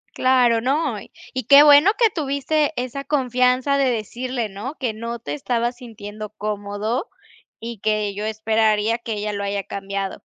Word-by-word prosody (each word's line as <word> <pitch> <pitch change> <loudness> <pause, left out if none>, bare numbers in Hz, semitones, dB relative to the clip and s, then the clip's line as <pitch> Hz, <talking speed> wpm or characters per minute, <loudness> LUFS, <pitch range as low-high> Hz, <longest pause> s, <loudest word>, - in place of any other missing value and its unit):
Claro, 245 -3 +3
no. 280 +6 0 0.4
Y 255 - -2
qué 280 +5 +8
bueno 295 +6 +7
que 460 -2 +5
tuviste 295 0 0
esa 255 +2 -5
confianza 255 0 +1
de 270 -2 +2
decirle, 240 +1 -3
¿no?, 210 +9 -7
que 240 -5 -1
no 230 +1 -5
te 145 -8 -6
estabas 240 - -1
sintiendo 215 -3 -9
cómodo 210 - -3 0.5
y 230 -2 -7
que 210 -1 0
yo 210 - -4
esperaría 220 0 +1
que 235 -1 -7
ella 210 0 -3
lo 200 0 -3
haya 200 0 -2
cambiado. 195 0 -5
230 Hz, 155 wpm, -21 LUFS, 210-260 Hz, 0.5 s, qué